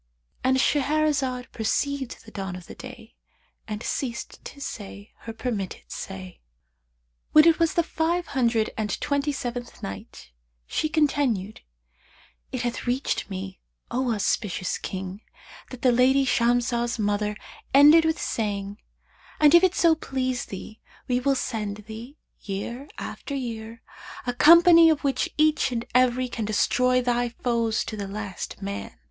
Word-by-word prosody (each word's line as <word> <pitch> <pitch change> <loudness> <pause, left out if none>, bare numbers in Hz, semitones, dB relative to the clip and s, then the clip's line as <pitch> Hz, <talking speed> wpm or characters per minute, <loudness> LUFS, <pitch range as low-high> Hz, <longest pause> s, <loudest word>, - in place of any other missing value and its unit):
'"—And 260 0 +3
Shahrazad 280 -3 +1
perceived 265 +4 -2
the 220 - -13
dawn 195 -3 -5
of 180 -1 -10
day - - -11 0.5
and 210 +1 -5
ceased 235 -4 -4
saying 205 -6 -7
her 225 - -7
permitted 225 -4 -4
say. 190 -2 -7 0.9
When 305 +1 +8
it 335 -1 +5
was 330 -1 +2
the 340 - +3
Five 335 +2 -1
Hundred 230 -4 +1
and 215 -2 -2
Twenty 285 +1 0
seventh 245 -3 -6
Night, 95 -9 -8 0.3
She 310 - -1
continued, 275 -10 0 0.9
It 255 -2 -3
hath 240 0 -3
reached 250 -1 -1
me, 190 0 -6 0.3
O 250 0 0
auspicious 205 -3 -1
King, 190 +1 -6 0.5
that 255 -1 -10
"the 255 - +5
lady 260 +3 +4
Shamsah's 240 -1 +1
mother 210 0 -1 0.3
ended 295 +4 +8
with 320 0 0
saying, 205 -2 -3 0.6
'And 300 0 +6
if 345 +1 +8
it 370 -1 +3
so 335 -1 +5
please 255 -5 -2
thee 210 +3 -9 0.3
we 250 -1 +1
will 275 +2 +2
send 210 -5 -3
thee, 230 +7 -9 0.2
year 235 +7 -5
after 280 - -6
year, 230 -3 -6 0.4
a 245 - -1
company 335 +4 +8
of 310 -1 +1
which 275 -1 0
each 305 -3 +3
and 235 -1 -2
every 255 0 +3
can 230 -3 -4
destroy 250 +4 +2
thy 245 0 +1
foes 230 -2 -1
to 215 - -5
the 200 -2 -5
last 205 -1 -6
man.' 100 -10 -5
245 Hz, 140 wpm, -25 LUFS, 215-280 Hz, 0.9 s, When